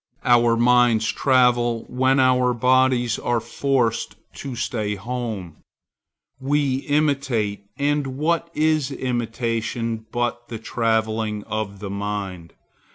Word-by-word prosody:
Our 120 -1 +4
minds 120 -2 +4
travel 120 -3 +2
when 130 +2 +2
our 125 -1 +3
bodies 125 -1 +2
are 120 -1 0
forced 125 -2 -1 0.2
to 135 -3 -6
stay 110 -3 -2
at 100 - -8
home. 110 -10 -4 0.8
We 140 -1 +1
imitate; 135 -9 0
and 145 -2 -1
what 170 +3 0
is 155 -3 +2
imitation 115 -3 -3
but 120 0 -2
the 115 - -6
travelling 110 -2 -1
of 105 -2 -4
the 100 -2 -5
mind? 100 -4 -5
120 Hz, 110 wpm, -22 LUFS, 110-130 Hz, 0.8 s, Our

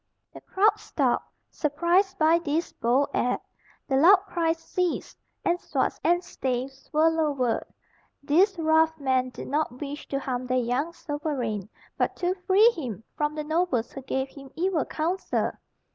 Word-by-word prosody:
The - - -11
crowd 420 +2 +2
stopped, 430 - -1 0.2
surprised 345 +6 +1
by 325 +1 +4
this 325 0 -2
bold 255 +5 +1
act; 250 +1 0 0.4
the 270 - +2
loud 355 +8 +8
cries 330 -3 0
ceased, 360 +1 -3 0.3
and 350 +1 +1
swords - - -1
and 350 +1 +3
staves 265 -2 -4
were 310 +2 +4
lowered. 295 -7 +1 0.6
These 365 +7 +3
rough 320 0 +3
men 260 -2 +1
did 250 - -8
not 280 -3 -1
wish 290 0 -6
to 275 - -2
harm 255 -2 -3
their 255 0 +1
young 250 +6 0
sovereign, 290 - -3 0.3
but - - +1
to 360 0 0
free 420 +5 +6
him 235 - -5
from 295 0 -1
the 305 - -3
nobles 315 -6 0
who 270 - -7
gave 265 +1 -2
him 275 0 -12
evil 350 -3 0
counsel. 345 +5 -1
300 Hz, 155 wpm, -26 LUFS, 265-340 Hz, 0.6 s, loud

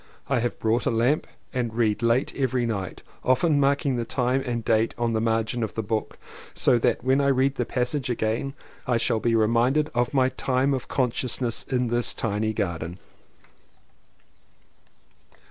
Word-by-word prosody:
I 135 -3 +2
have 120 0 -2
bought 115 +1 0
a - - +4
lamp 120 +6 +1 0.3
and 120 -4 -2
read 110 -2 +1
late 115 +3 +1
every 130 -3 0
night, 100 -5 -4 0.2
often 145 +4 +3
marking 140 -1 +2
the 120 - -1
time 125 +2 0
and 120 -3 -3
date 110 0 +2
on 120 -1 0
the 110 - 0
margin 115 +1 0
of 110 - -3
the 110 - -2
book 110 +1 -3 0.4
so 120 - +3
that 115 - +1
when 130 +2 +3
I 140 - +2
read 135 0 +3
the 120 -4 -2
passage 125 +2 -1
again 120 +4 -1 0.3
I 125 -2 +2
shall 115 -1 +1
be 115 +1 +1
reminded 120 +7 +2
of 120 0 +1
my 130 -2 +3
time 130 +1 0
of 130 - -3
consciousness 125 -2 0
in 125 -2 0
this 120 0 +1
tiny 110 0 -1
garden. 85 -5 -3
120 Hz, 165 wpm, -25 LUFS, 115-130 Hz, 0.4 s, a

